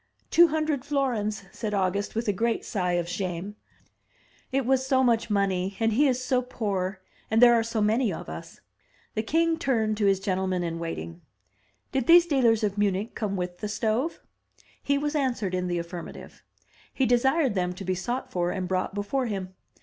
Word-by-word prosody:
"Two 345 +1 +7
hundred 310 -4 -1
florins," 245 -8 -1
said 210 -3 -3
August, 200 +2 -1
with 225 +1 -2
a 205 - +2
great 230 +4 -1
sigh 180 -4 -1
of 175 -1 0
shame. 185 +2 -4 0.5
" - - -37 0.3
It 270 -1 0
was 260 +1 +2
so 260 0 +2
much 235 -2 +2
money, 195 -2 0
and 225 -1 +2
he 285 +6 +4
is 255 -2 +1
so 255 -1 +1
poor, 195 -6 -3 0.3
and 220 - +2
there 240 0 +8
are 230 - +4
so 225 -1 -2
many 220 +2 +2
of 165 - -6
us." 80 +1 -9 0.5
The 215 - 0
king 325 +7 +1
turned 220 -5 +1
to 205 -2 +2
his 195 -1 +3
gentlemen 190 -2 -1
in 165 -1 -3
waiting. 165 +1 -5 0.7
"Did 265 -3 -1
these 345 +1 +8
dealers 240 -8 +3
of 205 -1 -1
Mimich 205 +2 0
come 205 -3 -2
with 180 -1 -4
the 210 - -3
stove?" 225 +9 -1 0.6
He 280 - +1
was 295 +1 -1
answered 250 -10 -1
in 180 0 -1
the 175 -1 -1
affirmative. 170 0 -8 0.5
He 265 - +1
desired 265 +2 +3
them 180 -2 0
to 190 +2 -8
be 185 - 0
sought 245 +8 -3
for 175 -1 0
and 185 0 -3
brought 185 +1 -1
before 240 +6 -1
him. 190 -3 -4
215 Hz, 190 wpm, -26 LUFS, 185-255 Hz, 0.7 s, there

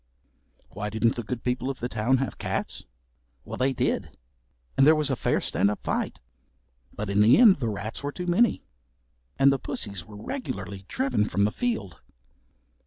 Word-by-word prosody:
Why 105 +1 -4
didn't 110 +2 +2
the 120 - -3
good 120 +1 -5
people 125 +1 -1
of 135 - -3
the 120 - -2
town 125 +3 +1
have 135 +1 -3
cats? - - -3 0.6
Well - - -6
they 130 +1 +3
did, - - -1 0.6
and 135 - +5
there 160 - +7
was 150 -2 +1
a - - +1
fair - - +1
stand 100 - +1
up 105 - -4
fight, - - -2 0.7
but 105 - -5
in 100 +1 +2
the 110 +4 +7
end 225 -6 +7
the 120 -5 -1
rats 105 +1 -5
were 145 0 -3
too 180 +4 -5
many, 185 +7 +2 0.7
and 135 0 +6
the 135 - -1
pussies 100 -7 -4
were 105 +3 -12
regularly 100 - -5
driven 260 - 0
from 100 +3 +1
the 105 - +1
field. 225 - -3
120 Hz, 180 wpm, -26 LUFS, 105-140 Hz, 0.7 s, there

